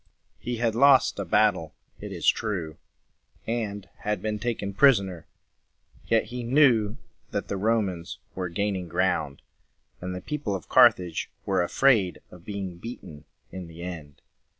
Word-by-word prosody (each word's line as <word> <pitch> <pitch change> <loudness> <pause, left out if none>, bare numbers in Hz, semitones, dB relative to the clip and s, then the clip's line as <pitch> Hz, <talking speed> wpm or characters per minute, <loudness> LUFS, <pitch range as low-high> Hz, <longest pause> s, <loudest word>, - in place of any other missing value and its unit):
He 120 0 -4
had 115 -1 +1
lost 130 -1 +5
a 100 - -2
battle, 95 -4 +2 0.2
it - - -7
is - - -4
true, 90 -8 0 0.7
and 105 -4 -3
had 105 -1 -2
been 105 +2 -3
taken 105 -3 -3
prisoner. 100 - +3 0.8
Yet 115 -1 +3
he 125 - -3
knew 120 -4 +3 0.3
that - - -4
the - - -1
Romans 100 -5 -1 0.2
were 90 -1 -3
gaining 95 0 -2
ground, 85 -5 -1 0.6
and 90 0 -4
the 90 - -6
people 140 -4 -3
of 95 - -7
Carthage 110 -10 +4 0.2
were 95 -2 +1
afraid 100 - +3
of 90 -2 -14
being 100 -4 -5
beaten 85 -9 -9 0.3
in 95 -2 -7
the 85 +1 -10
end. 80 -5 -8
100 Hz, 145 wpm, -26 LUFS, 90-115 Hz, 0.8 s, lost